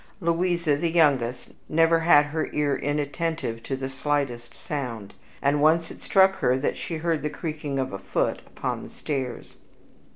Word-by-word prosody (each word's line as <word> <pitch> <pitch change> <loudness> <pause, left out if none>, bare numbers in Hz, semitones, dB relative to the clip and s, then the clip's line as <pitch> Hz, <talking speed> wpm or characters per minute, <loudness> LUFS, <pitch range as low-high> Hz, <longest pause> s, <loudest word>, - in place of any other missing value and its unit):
Louisa, 170 -2 +1
the 170 +3 0
youngest, 135 -7 +2 0.2
never 165 +1 +4
had 155 -3 +6
her 155 +2 -2
ear 145 -2 +1
inattentive 145 -3 -2
to 135 - -3
the 130 0 -4
slightest 135 -3 -2
sound, 115 -8 -5 0.3
and 145 +1 +2
once 165 +2 +3
it - - -12
struck 190 -1 +4
her 125 +1 +2
that 135 - -1
she 165 - -4
heard 165 -1 0
the 150 - -1
creaking 150 -3 -4
of 130 -5 -2
a 95 - -4
foot 95 0 -1
upon - - -4
the - - -9
stairs. 130 -5 -5
145 Hz, 165 wpm, -25 LUFS, 135-165 Hz, 0.3 s, had